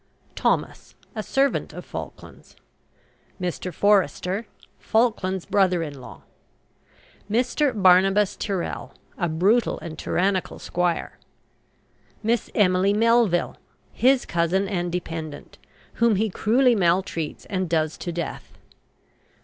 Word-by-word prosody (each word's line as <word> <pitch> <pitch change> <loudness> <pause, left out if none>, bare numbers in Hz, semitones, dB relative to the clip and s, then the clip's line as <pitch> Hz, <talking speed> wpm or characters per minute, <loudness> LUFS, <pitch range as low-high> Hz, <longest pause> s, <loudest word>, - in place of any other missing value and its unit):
THOMAS, - - -1 0.2
a 215 - -3
servant 270 +5 0
of - - -8
Falkland's. - - -9 0.8
MR. 180 0 -3
FORESTER, 195 +2 +1 0.3
Falkland's 190 -5 0
brother 185 -4 +2
in 145 -4 -7
law. - - -12 1.1
MR. 250 +2 +1
BARNABAS 190 +2 +4
TYRREL, 195 -5 -4 0.2
a 175 - 0
brutal 195 +9 +2
and 160 -2 -8
tyrannical 190 +1 0
squire. 175 -1 -2 1.0
MISS 230 +2 0
EMILY 190 -1 +3
MELVILLE, 225 -4 +2 0.4
his 260 +1 +3
cousin 175 +4 0
and 175 -3 -2
dependent, 160 -4 -6 0.3
whom 235 -2 +3
he 215 +1 0
cruelly 245 +6 +3
maltreats 175 -5 0
and 185 -3 -2
does 160 -1 0
to 175 - -4
death. 170 -2 -6
190 Hz, 105 wpm, -24 LUFS, 175-215 Hz, 1.1 s, BARNABAS